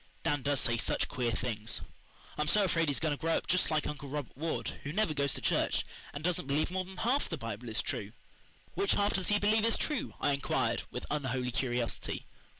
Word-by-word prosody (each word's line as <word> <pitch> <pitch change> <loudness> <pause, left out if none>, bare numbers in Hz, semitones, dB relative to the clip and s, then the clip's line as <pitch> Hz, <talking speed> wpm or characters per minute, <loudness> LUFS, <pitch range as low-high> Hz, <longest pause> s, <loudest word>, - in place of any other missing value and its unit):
Dan 145 -3 +1
does 140 0 +1
say 115 0 +2
such - - +1
queer 125 -4 -1
things. 115 -2 -1 0.5
I'm 150 - 0
so 205 +6 +5
afraid 165 -3 +2
he's 140 - +2
going 155 -2 +1
to - - -17
grow 165 0 +2
up - - -3
just 185 - +3
like 155 -2 +1
Uncle 145 -1 -5
Robert 145 -2 -4
Ward, 160 +4 -3
who 140 - -3
never 200 -2 +2
goes 140 -2 +1
to - - -5
church, - - +2 0.3
and 145 - -6
doesn't 175 -5 0
believe 145 +4 +1
more 185 0 0
than 190 0 -11
half 250 +8 +1
the 165 - -2
Bible 115 -1 -5
is 110 - 0
true." 100 0 -3 0.6
"Which 395 0 +2
half 205 +1 +2
does 190 - 0
he 205 - +4
believe 215 +2 +3
is 230 0 +3
true?" 300 -4 -1
I 145 - +2
inquired 140 0 +1
with - - -5
unholy 130 -4 -1
curiosity. 120 -1 -2
150 Hz, 220 wpm, -32 LUFS, 130-185 Hz, 0.6 s, so